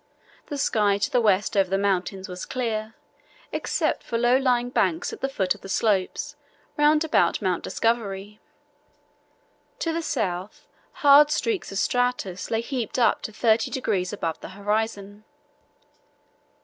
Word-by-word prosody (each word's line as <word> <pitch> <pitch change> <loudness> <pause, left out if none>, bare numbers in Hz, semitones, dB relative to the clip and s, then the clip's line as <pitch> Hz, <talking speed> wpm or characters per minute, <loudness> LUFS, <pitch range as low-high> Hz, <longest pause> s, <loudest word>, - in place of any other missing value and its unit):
The 290 - -4
sky 210 -7 +2
to 200 - -1
the 250 - +3
west 205 -2 +2
over 195 -2 +3
the 195 - +1
mountains 195 -1 -1
was 180 -1 -7
clear, 225 -3 -3 0.6
except - - -1
for 230 - -3
low 240 +2 +3
lying 245 -2 +1
banks 330 - 0
at 450 - -9
the 270 - 0
foot 190 -8 0
of 205 - -16
the 195 - -10
slopes 215 +8 0 0.4
round 300 +1 +4
about 320 - +2
Mount 185 -4 -1
Discovery. 210 -3 -2 1.4
To 330 - -2
the 335 - -1
south 195 - -3 0.4
hard 290 +1 +8
streaks 390 - -1
of 195 - -4
stratus 245 -5 -1
lay 225 0 0
heaped 240 -2 -4
up 240 - +3
to - - -6
30 220 +1 +2
degrees 200 -9 -1
above 165 -6 -3
the - - -9
horizon.... 205 0 -2
220 Hz, 150 wpm, -25 LUFS, 195-255 Hz, 1.4 s, hard